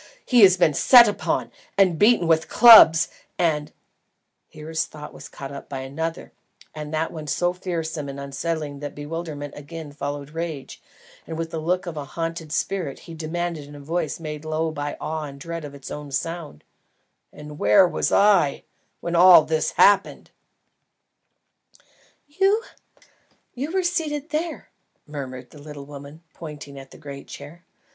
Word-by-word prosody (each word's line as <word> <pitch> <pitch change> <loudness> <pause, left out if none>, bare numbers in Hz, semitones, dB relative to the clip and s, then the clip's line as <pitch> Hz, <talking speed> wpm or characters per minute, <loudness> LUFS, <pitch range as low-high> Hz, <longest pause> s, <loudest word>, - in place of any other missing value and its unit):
He 245 -2 +4
has 190 -2 +7
been 165 -4 +3
set 240 - +7
upon 205 - -2 0.5
beaten 210 -1 +4
with 160 -1 +2
clubs, 220 -9 +8 0.3
and 150 -4 0 0.4
" - - -53
Here 155 +1 -11
his 160 0 -1
thought 150 -1 -11
was - - -11
caught 135 0 -9
up 140 - -9
by 135 -2 -5
another, 160 +5 -5 0.4
and 150 -1 -7
that 160 +1 -1
one 155 -2 -8
so 175 +4 0
fearsome 165 -5 -4
and 140 0 -7
unsettling 145 +1 -4
that 145 0 -7
bewilderment 145 -1 -6
again 150 +1 -9
followed 145 0 -6
rage, 160 -5 -6 0.5
and 160 0 -6
with 165 0 -4
the 160 - -3
look 180 +4 -1
of 170 -3 -6
a 145 - -4
haunted 165 +1 -5
spirit, 175 -4 -3
he 165 - -11
demanded 165 -1 -4
in 145 - -12
a - - -10
voice 165 +6 -3
made 150 -2 -6
low 160 +1 -2
by 145 -1 -5
awe 155 -1 -4
and 140 -1 -10
dread 165 +1 -6
of 145 -1 -9
its 140 - -10
own 150 -1 -7
sound, 165 +3 -5 0.7
"AND 150 0 -11
WHERE 105 - +5
WAS - - -1
I, 200 -9 +3 0.4
WHEN 170 0 -3
ALL 175 -2 +8
THIS 160 -1 -1
HAPPENED?" 200 -1 +3 2.0
"You? 390 +9 +1 0.9
You 280 +5 -4
were 380 0 0
seated 315 -4 -2
there," 320 +2 -3 0.4
murmured 130 -4 -8
the 150 - -14
little 145 -1 -10
woman, 145 +3 -11
pointing 145 -3 -9
at 135 0 -13
the - - -15
great 140 -2 -10
chair. 150 +5 -11
160 Hz, 160 wpm, -23 LUFS, 145-175 Hz, 2.0 s, clubs